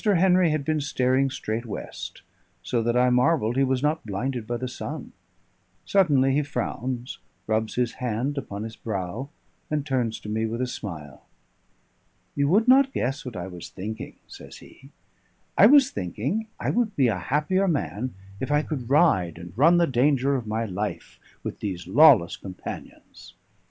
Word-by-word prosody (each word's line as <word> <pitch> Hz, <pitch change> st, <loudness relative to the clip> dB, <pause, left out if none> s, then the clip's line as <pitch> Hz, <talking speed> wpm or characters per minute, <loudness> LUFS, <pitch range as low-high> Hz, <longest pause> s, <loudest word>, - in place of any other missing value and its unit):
Henry 185 Hz, -4 st, +4 dB
had 155 Hz, -2 st, -1 dB
been 155 Hz, 0 st, 0 dB
staring 130 Hz, -1 st, +1 dB
straight 115 Hz, -3 st, -3 dB
west, 105 Hz, -, -7 dB, 0.4 s
so 120 Hz, -2 st, 0 dB
that 120 Hz, +2 st, +1 dB
I 125 Hz, 0 st, +4 dB
marvelled 125 Hz, -2 st, +2 dB
he 135 Hz, -, +3 dB
was 130 Hz, 0 st, 0 dB
not 150 Hz, +2 st, +1 dB
blinded 115 Hz, +3 st, -3 dB
by 120 Hz, -, -2 dB
the 130 Hz, +2 st, -4 dB
sun; 125 Hz, -, -6 dB, 0.7 s
suddenly 140 Hz, -9 st, +3 dB
he 145 Hz, -, +3 dB
frowns, 125 Hz, -2 st, -4 dB, 0.3 s
rubs 110 Hz, 0 st, -1 dB
his 125 Hz, -1 st, +1 dB
hand 125 Hz, +4 st, -1 dB
upon 105 Hz, -7 st, -5 dB
his 110 Hz, 0 st, -7 dB
brow, 105 Hz, +5 st, -4 dB, 0.4 s
and 150 Hz, -2 st, -1 dB
turns 125 Hz, -6 st, -1 dB
to -, -, -10 dB
me 110 Hz, +1 st, -1 dB
with 115 Hz, +2 st, -4 dB
a 130 Hz, -, +1 dB
smile. 75 Hz, -, -8 dB, 1.1 s
"You 140 Hz, 0 st, +2 dB
would 210 Hz, -, +3 dB
not 270 Hz, +1 st, +6 dB
guess 135 Hz, +4 st, -2 dB
what 125 Hz, -4 st, -7 dB
I 90 Hz, -2 st, -4 dB
was 90 Hz, -3 st, -9 dB
thinking," 110 Hz, +4 st, -7 dB
says -, -, -11 dB
he. -, -, -16 dB, 0.7 s
"I 200 Hz, -, +8 dB
was 280 Hz, +1 st, +6 dB
thinking 120 Hz, -, -3 dB
I -, -, 0 dB
would 230 Hz, -4 st, 0 dB
be 135 Hz, -3 st, +3 dB
a 105 Hz, -5 st, 0 dB
happier 150 Hz, -, +1 dB
man 130 Hz, -, -2 dB, 0.2 s
if 130 Hz, -, -3 dB
I 150 Hz, +1 st, +3 dB
could 130 Hz, -7 st, -5 dB
ride 100 Hz, -, +3 dB
and 85 Hz, +1 st, -10 dB
run 165 Hz, +8 st, +5 dB
the 170 Hz, -, +4 dB
danger 135 Hz, 0 st, +2 dB
of 120 Hz, -4 st, -3 dB
my 110 Hz, +2 st, -1 dB
life 105 Hz, +1 st, -5 dB, 0.2 s
with -, -, -5 dB
these 90 Hz, -4 st, -4 dB
lawless 120 Hz, -, +6 dB
companions." 95 Hz, -2 st, -10 dB
125 Hz, 170 wpm, -25 LUFS, 110-150 Hz, 1.1 s, I